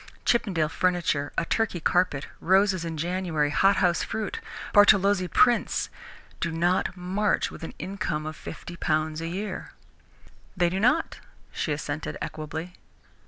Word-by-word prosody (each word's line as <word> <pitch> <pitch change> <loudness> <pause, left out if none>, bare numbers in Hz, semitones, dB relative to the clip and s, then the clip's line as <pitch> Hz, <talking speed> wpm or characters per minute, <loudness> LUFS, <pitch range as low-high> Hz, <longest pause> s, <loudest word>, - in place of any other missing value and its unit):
Chippendale 185 -10 +2
furniture, 170 -4 0
a 170 - +1
Turkey 215 -2 0
carpet, 170 -4 +1
roses 190 0 +3
in 165 -1 -4
January, 165 -3 0
hothouse 190 -1 +3
fruit, 220 -2 -3 0.3
Bartolozzi 200 -2 +5
prints, 240 +5 +2 0.5
do 170 - -1
not 175 +2 +1
march 190 +4 0
with - - -10
an 165 - -7
income 175 -5 -3
of 155 0 -5
fifty 175 +3 -8
pounds 155 -1 -1
a 165 - -3
year." 190 +3 -5 0.8
"They 175 -1 +3
do 190 - -1
not," 250 +10 +2 0.3
she 155 - -2
assented 145 +1 -3
equably. 160 +3 -5
175 Hz, 130 wpm, -26 LUFS, 160-195 Hz, 0.8 s, Bartolozzi